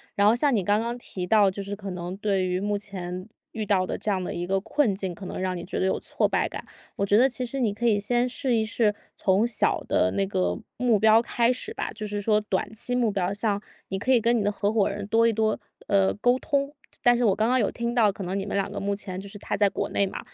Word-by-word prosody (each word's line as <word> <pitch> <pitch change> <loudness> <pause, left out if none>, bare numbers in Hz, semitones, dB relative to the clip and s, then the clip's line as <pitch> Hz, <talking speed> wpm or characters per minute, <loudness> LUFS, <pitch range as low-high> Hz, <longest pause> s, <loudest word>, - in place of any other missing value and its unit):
然 200 - +3
后 210 - +6
像 255 +1 +2
你 200 - +1
刚 205 +3 +2
刚 235 +2 -3
提 185 -6 -6
到 205 -1 +5
就 200 +1 -6
是 200 +1 -5
可 200 -1 -7
能 180 0 -5
对 195 -2 0
于 180 +1 -1
目 205 0 0
前， 185 -2 -6 0.2
遇 215 -2 -4
到 185 -2 +2
的 - - -3
这 215 - -4
样 190 -2 0
的 - - -4
一 175 +1 -4
个 195 0 +1
困 220 0 +1
境 190 -2 -4
可 185 +2 -9
能 - - -5
让 185 -1 -1
你 170 - -5
觉 180 - -4
得 - - +1
有 190 - +1
挫 - - 0
败 - - 0
感。 - - -7 0.3
我 200 - 0
觉 205 - +3
得 255 +5 +5
其 255 0 -3
实 270 +3 -4
你 230 -4 +2
可 225 +4 -4
以 210 -3 +4
先 240 +4 +1
试 255 -1 -1
一 220 - +1
试， 220 -1 +1 0.2
从 195 +3 +2
小 235 -3 +1
的 90 - +2
那 100 - +2
个 90 -2 -1 0.2
目 240 -3 +3
标 220 +2 +5
开 235 +1 +1
始 - - -6
吧。 - - -3
就 215 -1 -5
是 205 0 -3
说 210 +1 +2
短 200 +1 -2
期 245 +3 -2
目 235 -4 +2
标 190 -1 -1
像， 205 0 -1 0.3
你 190 0 -2
可 260 - 0
以 250 - +6
跟 235 +2 +2
你 225 - +1
的 205 - +1
合 205 +1 -1
伙 210 -3 +3
人 200 0 -5
多 225 +2 +3
一 230 - +3
多， 220 0 0 0.3
呃， 195 -1 +3
沟 245 +5 +2
通。 280 0 -1 0.3
但 245 0 +6
是 245 - +1
我 195 -3 +4
刚 220 +2 +1
刚 255 +1 +3
有 210 - +2
听 235 0 -3
到 220 -4 +4
可 195 - -7
能 185 +2 -3
你 195 - -2
们 200 - -4
两 200 0 -1
个 205 - -4
目 200 0 -1
前 190 -2 -6
就 195 - -8
是 205 - -10
他 - - -3
在 205 -1 +3
国 - - -2
内 200 - +1
嘛， - - -6
205 Hz, 305 characters per minute, -26 LUFS, 195-230 Hz, 0.3 s, 后